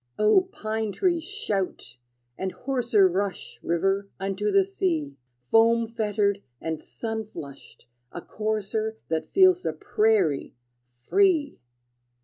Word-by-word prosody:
O 365 - +4
pine 220 - -3
tree, 345 - +1
shout! 205 - -4 0.4
And 190 +5 -3
hoarser 235 -7 +2
Rush, 190 +2 -3
river, 195 +4 0
unto 195 +2 -1
the 195 0 +5
sea, 165 -7 -2 0.4
Foam 230 +1 +5
fettered 210 -3 0 0.2
and 160 -1 -4
sun 220 -2 -5
flushed, 140 -12 -11 0.3
a - - -6
courser 215 +2 -3
That 160 -1 -2
feels 370 -2 +5
the - - -2
prairie, 215 - +1 0.4
free! 325 - +2
210 Hz, 115 wpm, -26 LUFS, 190-230 Hz, 0.4 s, the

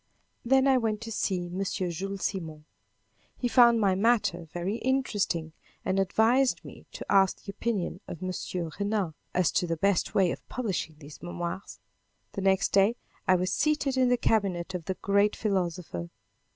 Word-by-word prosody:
Then 265 +2 +4
I 265 -1 +5
went 220 -3 -1
to 225 0 -6
see 185 -4 -1
M. 180 +3 -3
Jules 190 +1 -3
Simon. 160 -6 -4 0.7
He 245 - -1
found 235 -1 +6
my 200 -3 +3
matter 195 -4 +2
very 180 +5 -2
interesting 205 -11 -1 0.3
and 190 +1 +1
advised 225 +7 +2
me - - -12
to - - -7
ask 195 -1 +3
the 200 - -6
opinion 200 -4 -2
of 170 - -7
M. 185 - -2 0.5
Renan, 200 -5 0 0.2
as 180 -2 +3
to 180 - +1
the 165 -1 -1
best 195 +1 +1
way 185 -4 +4
of - - -8
publishing 195 -10 -3
these 150 -1 -12
memoirs. 175 +2 -5 0.5
The 195 - -4
next 190 0 +3
day 200 +4 +4 0.3
I 185 - +6
was 185 +1 0
seated 295 -3 +1
in 255 -1 +3
the 245 - +3
cabinet 190 -6 0
of 175 -3 -4
the 190 - -2
great 200 +2 +2
philosopher. 175 - -2
195 Hz, 165 wpm, -28 LUFS, 175-225 Hz, 0.7 s, found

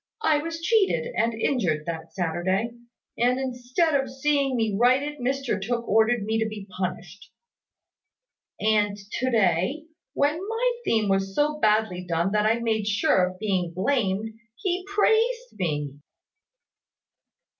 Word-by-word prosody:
I 310 -7 +3
was 330 +2 -5
cheated 445 +4 +2
and 230 0 +1
injured 185 - 0
that 165 -1 -5
Saturday; 185 +5 -1 0.5
and, 250 +2 +2
instead 260 +5 0
of 270 -2 +1
seeing 275 0 0
me 225 -4 0
righted, 265 +6 +2
Mr 255 -4 -1
Tooke 235 +3 -2
ordered 220 +1 +3
me 220 +2 0
to 220 0 0
be 210 -2 -8
punished. 185 0 -5 1.3
And 210 -1 +2
to 210 +6 -3
day, 220 - +1 0.3
when 295 +2 +1
my 455 +5 -1
theme 220 -2 +2
was 195 0 0
so 300 +1 +1
badly 215 -5 +2
done 170 +1 0
that 210 0 +2
I 225 +1 +3
made 220 -3 -1
sure 205 -3 +3
of 185 0 -8
being 185 -5 -1
blamed, 220 -1 -1 0.2
he 360 +6 -2
praised 455 - +1
me." 150 -5 -2
225 Hz, 135 wpm, -25 LUFS, 195-280 Hz, 1.3 s, I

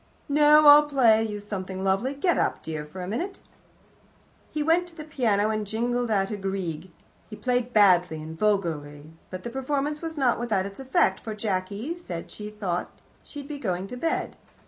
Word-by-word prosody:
"No; 300 +1 +6
I'll 295 0 +8
play 235 -6 +4
you 210 -1 -5
something 190 -2 -5
lovely. 195 +8 0
Get 340 +5 +1
up, - - -1
dear, 155 -2 -5
for 180 +4 -8
a - - -5
minute." 345 - -3 1.1
He 300 - -2
went 335 +3 +2
to 340 - -16
the 310 - -7
piano 220 -9 +1
and 215 -1 -2
jingled 240 +3 -1
out 195 -3 +1
a - - -7
little 195 -1 -3
Grieg. 180 -3 -4 0.4
He 215 - -7
played 245 +1 -1
badly 180 -7 +4
and 160 +1 -8
vulgarly, 160 -7 -1 0.2
but 185 0 -7
the 235 - -5
performance 280 +3 -2
was 325 -1 -5
not 255 -5 +2
without 215 -6 0
its 200 +3 -8
effect, 265 0 +2
for 220 -2 -6
Jacky 205 - -3
said 175 - -7
she 210 0 -7
thought 195 -5 -3 0.3
she'd 285 -2 -9
be 290 -1 -6
going 185 -6 -2
to - - -6
bed. 325 +6 -2
215 Hz, 190 wpm, -26 LUFS, 190-280 Hz, 1.1 s, I'll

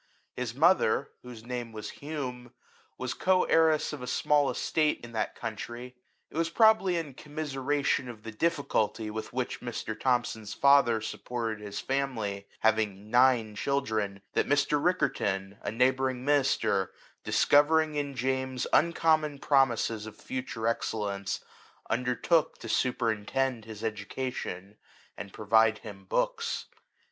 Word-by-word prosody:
His 120 -2 -4
mother, 150 -4 +3
whose 120 -3 -10
name 120 -2 -4
was 105 -1 -6
Hume, 130 -5 -6 0.4
was 130 -1 -3
co 185 +5 +3
heiress 160 -2 +3
of 145 - -6
a 125 - -6
small 145 +1 +2
estate 155 -1 0
in 120 - -9
that 110 -2 -2
country. 120 +2 -6 0.4
It - - -8
was 165 0 +1
probably 220 -2 +4
in 155 -5 -4
commiseration 145 -2 -1
of 110 -3 -10
the 115 - -6
difficulty 110 -5 0
with 110 0 -5
which 125 0 -3
Mr. 120 -2 -4
Thomson's 120 -4 -1
father 140 -5 +5
supported 115 0 -4
his 100 0 -5
family, 115 -8 -2
having 105 -2 +1
nine 120 -3 +4
children, 110 -7 -1
that - - +1
Mr. 145 0 +2
Riccarton, 100 - 0
a - - -3
neighbouring 130 +2 +1
minister, 135 -9 +2 0.3
dicovering 155 +1 +4
in 145 -2 -2
James 130 0 -1
uncommon 155 -2 +3
promises 120 -6 +2
of 110 - -10
future 125 -3 -5
excellence, 100 -4 -2 0.5
undertook 125 +7 +1
to - - -9
superintend 120 0 0
his 110 -2 -9
education, 105 -2 -4 0.4
and 100 - -8
provide 110 +1 +3
him 95 -2 -9
books. - - -1
125 Hz, 130 wpm, -29 LUFS, 110-140 Hz, 0.5 s, father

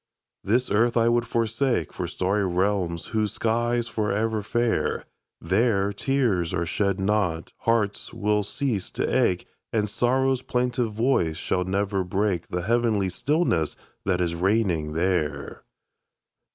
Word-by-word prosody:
This 120 +5 +1
earth 120 +3 +3
I 115 0 +4
would 120 0 +1
forsake 115 +3 0
For 90 - -3
starry 95 +4 0
realms 90 -2 0
whose 110 -1 0
sky's 120 +1 0
forever 110 0 0
fair; 120 +3 0 0.3
There, 100 +2 +1
tears 105 -8 0
are 85 - 0
shed 100 +3 0
not, 95 -5 0 0.2
hearts 105 -3 0
will 105 0 +1
cease 110 -2 -2
to - - +1
ache, 90 - +1 0.3
And 105 -2 +1
sorrow's 130 +4 +1
plaintive 125 -2 0
voice 105 -9 +1
shall 90 0 -1
never 100 +1 0
break 95 -1 -1
The 90 0 -3
heavenly 110 -2 +1
stillness 90 - 0 0.3
that 90 -2 0
is 85 -1 0
reigning 90 -4 +1
there. 80 -4 -1
105 Hz, 130 wpm, -25 LUFS, 90-115 Hz, 0.3 s, I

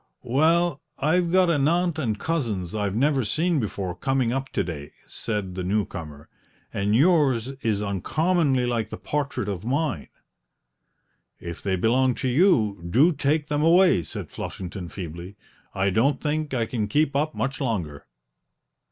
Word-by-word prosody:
"Well, 160 +5 +2 0.2
I've 170 +3 +1
got 185 -1 +4
an 145 -3 +2
aunt 170 0 +1
and 110 -7 -1
cousins 115 - -2
I've 105 -2 -1
never 135 +2 +2
seen 160 - +1
before 100 -5 -3
coming 130 +4 0
up 135 0 -3
to - - +1
day," 75 -5 -7
said 105 -5 -4
the 90 0 -4
new 100 +3 +1
comer, 75 -2 -9 0.5
"and 100 +2 +1
yours 135 -5 +3
is 105 -2 0
uncommonly 135 - +1
like 115 -3 -1
the - - -6
portrait 145 -7 -2
of 100 -2 -4
mine." 130 - -1 1.3
"If 85 -1 -7
they 95 -2 0
belong 125 +6 +2
to - - -2
you, 120 - +3
do 145 - +4
take 150 +1 0
them 150 0 -1
away!" 175 - +5
said - - -7
Flushington 90 -1 -6
feebly; 85 +1 -7 0.4
"I 95 0 +1
don't 130 +7 +2
think 155 0 -2
I 120 -4 0
can 110 -2 -2
keep 145 +5 +1
up 155 +2 0
much 135 +3 -2
longer." 90 - -3
125 Hz, 155 wpm, -25 LUFS, 100-150 Hz, 1.3 s, away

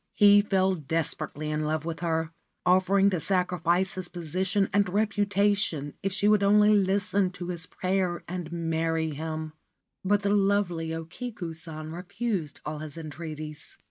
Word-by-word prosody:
He 205 -1 +7
fell 190 -2 +2
desperately 155 -1 -2
in 155 0 -1
love 155 0 -1
with 165 -1 -4
her, 160 -1 -1 0.3
offering 190 +2 +4
to 180 - 0
sacrifice 180 0 +1
his 185 -1 -5
position 185 +4 -1
and 200 -2 +3
reputation 200 -6 +1
if 195 - -1
she 200 +2 +1
would 210 -1 +5
only 210 +1 +5
listen 200 -1 +2
to 175 -1 -6
his 175 -1 -1
prayer 185 -2 -1
and 175 -2 -5
marry 165 -1 -1
him; 155 +1 -4 0.5
but 205 +1 +2
the 200 - +2
lovely 195 -5 +1
O 165 0 -4
Kiku 185 -2 -6
San 155 -1 -6
refused 180 -1 -3
all 150 0 -4
his 155 0 -8
entreaties. 155 -1 -7
180 Hz, 150 wpm, -27 LUFS, 160-200 Hz, 0.5 s, He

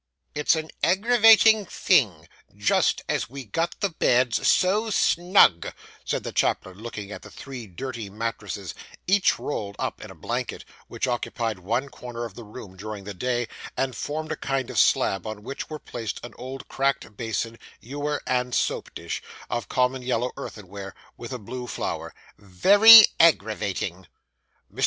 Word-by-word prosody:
'It's 150 +2 +2
an 160 0 -5
aggravating 220 +1 +5
thing, 185 - +1 0.3
just - - +2
as - - -1
we 135 0 -8
got 165 +11 -2
the 200 - +1
beds 125 -6 +2
so 210 +5 +3
snug,' 175 - +3 0.3
said - - -2
the - - -5
chaplain, 95 0 -1
looking 105 -3 -7
at - - -7
three 130 -5 -9
dirty 115 +2 -6
mattresses, 105 -3 -5 0.3
each 195 +1 +3
rolled 100 -8 -4
up - - -4
in - - -9
a - - -11
blanket; - - -4 0.2
which - - -3
occupied 115 -4 -2
one 115 +9 -1
corner 125 -2 -7
of 115 - -9
the 120 - -10
room 105 -3 -11
during 105 +1 -7
the 100 +1 -7
day, 120 +4 -1 0.3
and 130 -2 -1
formed 155 +5 -4
a - - -1
kind 135 -3 -2
of - - 0
slab, 95 +3 +2
on 110 -1 -7
which 135 +4 -6
were 155 - -5
placed 115 -8 -6
an 120 - -10
old 130 +2 -8
cracked 135 -5 -1
basin, 115 +1 -3 0.2
ewer, 145 +4 -4
and 125 -1 0
soap - - -1
dish, - - -5 0.3
of 120 -4 -3
common 125 0 +1
yellow 125 0 -1
earthenware, 100 -1 -8 0.2
with 120 - -9
a 125 - -3
blue 125 +3 -7
flower - - -4 0.3
'very 205 - +9
aggravating.' 100 - +1 0.7
Mr. - - -20
125 Hz, 155 wpm, -25 LUFS, 105-145 Hz, 0.7 s, very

